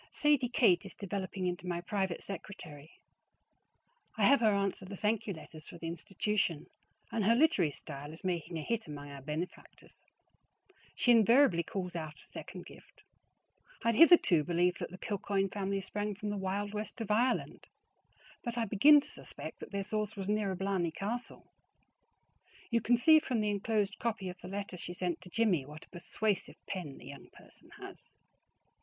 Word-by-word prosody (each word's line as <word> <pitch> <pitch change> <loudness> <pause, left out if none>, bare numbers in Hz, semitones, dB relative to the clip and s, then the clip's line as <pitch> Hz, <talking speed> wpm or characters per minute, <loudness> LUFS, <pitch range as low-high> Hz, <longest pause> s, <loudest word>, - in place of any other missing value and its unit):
Sadie 295 -5 +2
Kate 185 -9 +4
is - - -10
developing 195 -1 -4
into 180 0 -3
my 175 -1 -1
private 190 -1 -2
secretary. 160 -6 -8 1.3
I - - +3
have 280 - +6
her 220 -2 +4
answer 200 -1 0
the 195 +1 -8
thank 220 +2 0
you 200 - -1
letters 155 -1 -11
for - - -10
the 165 - -8
institution, 175 0 -1 0.5
and 225 - 0
her 225 +4 +5
literary 245 - +4
style 145 0 -8
is 160 - -11
making 175 -2 -2
a 155 - -4
hit 230 -1 -2
among 145 -1 -8
our 140 -1 -9
benefactors. 155 +6 -7 0.9
She 245 - +3
invariably 230 -4 +6
calls 180 +1 -5
out 155 -2 -5
a - - -17
second - - -9
gift. - - -16 0.8
I - - +3
had 230 - +2
hitherto 305 - +7
believed 175 +2 +1
that - - -4
the 185 - -10
Kilcoyne 195 -1 -1
family 195 0 -2
sprang 205 +2 -3
from 210 +1 -4
the - - -2
wild 200 +2 -2
west 215 +3 -5
of 220 -2 -3
Ireland, 245 +4 +1 0.8
but 235 0 -4
I 230 - +1
begin 285 +9 +7
to - - -14
suspect - - -9
that - - -8
their 200 -1 -2
source 215 +1 -2
was 195 -2 -5
nearer 205 -2 0
Blarney 190 -2 0
Castle. 215 +9 -5 1.3
You 230 0 +3
can 240 +3 +3
see 315 +5 +7
from 250 -6 -1
the 210 -1 +1
inclosed 205 -1 0
copy 220 -5 -2
of 180 - -9
the - - -8
letter 195 -1 -5
she 175 - -6
sent 180 -1 -2
to 180 - -11
Jimmie 180 -9 +1
what 150 +1 -11
a - - -35
persuasive 195 +3 -2
pen 175 -8 -5
the - - -13
young 140 0 -11
person - - -16
has. - - -11
195 Hz, 180 wpm, -32 LUFS, 175-215 Hz, 1.3 s, hitherto